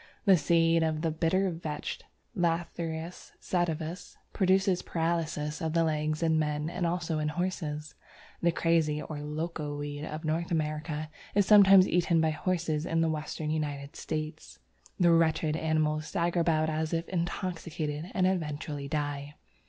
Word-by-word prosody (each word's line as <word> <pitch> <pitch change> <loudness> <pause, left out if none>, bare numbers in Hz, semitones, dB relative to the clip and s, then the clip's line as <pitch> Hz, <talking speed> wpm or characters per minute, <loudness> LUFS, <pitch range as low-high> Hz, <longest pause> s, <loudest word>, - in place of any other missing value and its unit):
The 195 -2 +7
seeds 165 0 +3
of 155 -1 0
the 165 -1 0
Bitter 180 +4 +1
Vetch 160 -3 -4 0.4
(Lathyrus 170 -1 -2
sativus) 170 -1 -2 0.2
produce 190 -1 +3
paralysis 160 -2 -2
of 160 -1 -1
the 165 0 +3
legs 155 0 0
in 160 -1 +3
man 150 +1 -1
and 175 -1 -1
also 170 -2 -1
in 150 - 0
horses. 155 -2 -3 0.5
The 170 - +3
Crazy 165 -3 +2
or 150 -1 -6
Loco 150 0 -4
weed 145 0 -5
of 155 +1 -5
North 165 +2 -1
America 155 -1 -2 0.2
is 205 -1 +4
sometimes 195 -2 +8
eaten 170 -1 +2
by 160 0 +3
horses 160 -2 -1
in 165 0 +1
the 165 - +2
Western 155 0 -3
United 145 -2 -3
States. 155 0 -5 0.4
The 175 -2 +5
wretched 160 -2 +3
animals 155 -1 0
stagger 175 -1 0
about 160 -2 +2
as 155 +1 -2
if 165 0 -1
intoxicated, 170 -3 -3
and 185 - +3
eventually 150 -5 -2
die. 145 -1 -3
160 Hz, 145 wpm, -29 LUFS, 155-170 Hz, 0.5 s, sometimes